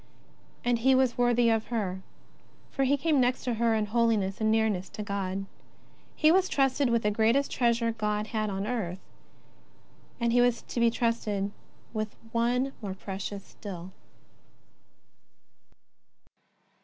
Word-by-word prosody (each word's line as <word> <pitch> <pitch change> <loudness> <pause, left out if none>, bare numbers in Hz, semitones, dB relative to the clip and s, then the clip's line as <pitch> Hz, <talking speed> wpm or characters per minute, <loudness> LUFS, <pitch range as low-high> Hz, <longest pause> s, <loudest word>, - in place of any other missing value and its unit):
And 245 -1 +2
he 265 +3 +4
was 260 -2 +2
worthy 240 -1 +3
of 225 -1 0
her, 195 -6 -2 0.7
for 275 - 0
he 280 +2 +3
came 295 -1 +2
next 250 +1 +1
to 245 - -1
her 230 0 +2
in 215 -1 +1
holiness 215 -3 +1
and 220 - +2
nearness 220 -4 +1
to 210 - -6
God. 195 -1 -3 0.7
He 310 0 +5
was 375 +1 +3
trusted 270 -1 +2
with 235 -1 +1
the 210 - +2
greatest 230 +6 +2
treasure 235 -1 +1
God 210 -1 -1
had 215 -1 -2
on 195 0 -3
earth, 210 -7 -2 1.2
and 235 -1 +1
he 245 - +5
was 245 -1 +2
about - - -30
to - - -3
be 235 0 +5
trusted 220 -4 -1 0.4
with 215 -1 -3 0.2
One 245 +3 +1
more 195 -3 -4
precious 195 +1 -7
etill. 185 -3 -7
230 Hz, 145 wpm, -28 LUFS, 205-245 Hz, 1.2 s, He